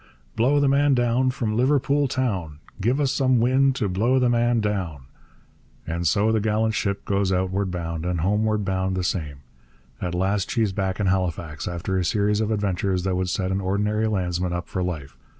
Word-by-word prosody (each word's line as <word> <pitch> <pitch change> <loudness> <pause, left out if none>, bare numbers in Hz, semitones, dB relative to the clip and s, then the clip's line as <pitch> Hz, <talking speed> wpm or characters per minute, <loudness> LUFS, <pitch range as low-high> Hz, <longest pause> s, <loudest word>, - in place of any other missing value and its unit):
Blow 135 +6 +3
the 145 - +3
man 140 0 +3
down 120 +1 +2
from 115 -4 -2
Liverpool 140 +3 +2
town; 95 - -2 0.2
Give 120 +7 +1
us 140 -3 +1
some 130 -3 +2
wind 130 +3 +3
to 110 -6 -1
blow 110 +8 +1
the 125 -2 +3
man 120 0 +2
down. 95 -10 -2 0.8
And 85 +1 -2
so 100 +7 +2
the 110 - +2
gallant 110 +1 +1
ship 100 -1 -2
goes 100 -1 0
outward 95 +1 0
bound; 85 -2 -4
and 90 -2 -1
homeward 105 +3 +1
bound 95 0 -1
the 90 - -1
same. 75 -6 -3 0.6
At 90 -1 -2
last 95 +2 0
she's 110 -4 +1
back 95 -1 -2
in 105 - 0
Halifax, 85 -5 -1
after 90 +2 -2
a - - 0
series 105 +2 +1
of 110 - 0
adventures 95 -3 0
that 95 -1 0
would 90 0 -1
set 95 +1 -1
an 95 +1 -1
ordinary 105 +3 0
landsman 90 -3 -1
up 85 0 -4
for 95 - -3
life. 80 -7 -4
100 Hz, 190 wpm, -24 LUFS, 90-115 Hz, 0.8 s, Blow